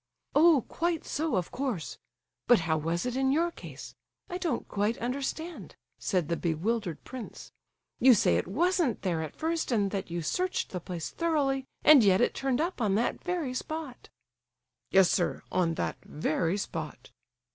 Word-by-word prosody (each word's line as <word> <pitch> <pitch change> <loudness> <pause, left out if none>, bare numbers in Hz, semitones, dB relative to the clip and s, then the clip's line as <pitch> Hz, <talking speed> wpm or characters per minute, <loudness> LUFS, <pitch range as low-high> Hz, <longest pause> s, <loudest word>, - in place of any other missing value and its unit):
"Oh, 305 -4 +5
quite 335 -1 -1
so, 315 +2 -1
of 180 -2 -1
course. 250 - -3 0.5
But 245 -6 +6
how 160 -1 +1
was 165 +4 -1
it 250 -1 -2
in 265 0 +2
your 335 +4 +2
case?—I 360 +1 -10
don't 345 -4 -2
quite 210 +3 0
understand," 280 +7 -4 0.2
said 180 -6 0
the 170 - 0
bewildered 175 +2 -2
prince. 255 -3 -9 0.5
"You 255 -1 +7
say 85 - +3
it - - -2
wasn't 330 - +1
there 170 -4 0
at 155 -2 -6
first, 325 -2 -1
and 205 -4 +1
that 195 -2 -3
you 170 0 -3
searched 365 - -1
the 180 - -3
place 170 -1 -5
thoroughly, 285 -5 0 0.2
and 295 -6 +8
yet 190 -2 +5
it 245 - +2
turned 270 -2 -1
up 335 -3 -1
on 205 -3 +2
that 230 +3 0
very 350 -7 -2
spot!" 305 0 -6 0.8
"Yes, 190 -2 +5
sir—on 175 -1 0
that - - -2
very 165 +4 -1
spot." 160 -6 -6
240 Hz, 160 wpm, -29 LUFS, -, 0.8 s, and